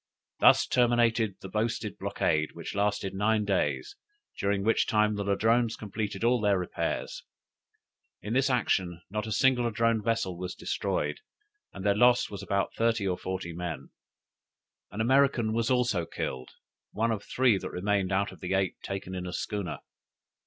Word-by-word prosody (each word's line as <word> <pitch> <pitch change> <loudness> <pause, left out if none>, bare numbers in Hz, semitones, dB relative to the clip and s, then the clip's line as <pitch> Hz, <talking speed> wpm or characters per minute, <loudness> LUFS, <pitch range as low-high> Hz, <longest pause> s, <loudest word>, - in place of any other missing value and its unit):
Thus - - +6
terminated 120 -4 +2
the - - -7
boasted 110 +4 -2
blockade, 75 0 0
which - - -7
lasted 100 -1 0
nine 105 +2 +1
days, 75 -10 -1 0.4
during 100 0 0
which 115 +2 +2
time 105 0 +2
the 105 -1 -2
Ladrones 115 +3 +2
completed 105 -1 -4
all 120 0 +3
their 100 -2 +3
repairs. 90 -1 -3 1.0
In 105 - -5
this 135 +2 +3
action 90 -9 0
not 105 +1 -3
a - - -5
single 125 +1 +3
Ladrone 115 -1 +1
vessel 100 -5 -1
was 90 0 -5
destroyed, - - -2 0.5
and 95 - -8
their 100 - +4
loss 120 +3 +4
was 100 - -6
about 100 0 -1
thirty 115 -3 +1
or 90 - +1
forty 95 -2 -4
men. 80 -6 -6 1.0
An 105 - -4
American 130 -2 +3
was 115 +1 0
also 120 -10 +1
killed, 65 -5 -4 0.4
one 115 +2 0
of 105 -2 -3
three 125 -6 +2
that - - -5
remained 100 0 0
out 100 +1 +1
of - - -15
eight 95 +1 -1
taken 95 -1 -5
in 90 -1 -4
a - - -5
schooner. 100 -4 -4
105 Hz, 160 wpm, -28 LUFS, 95-115 Hz, 1.0 s, Thus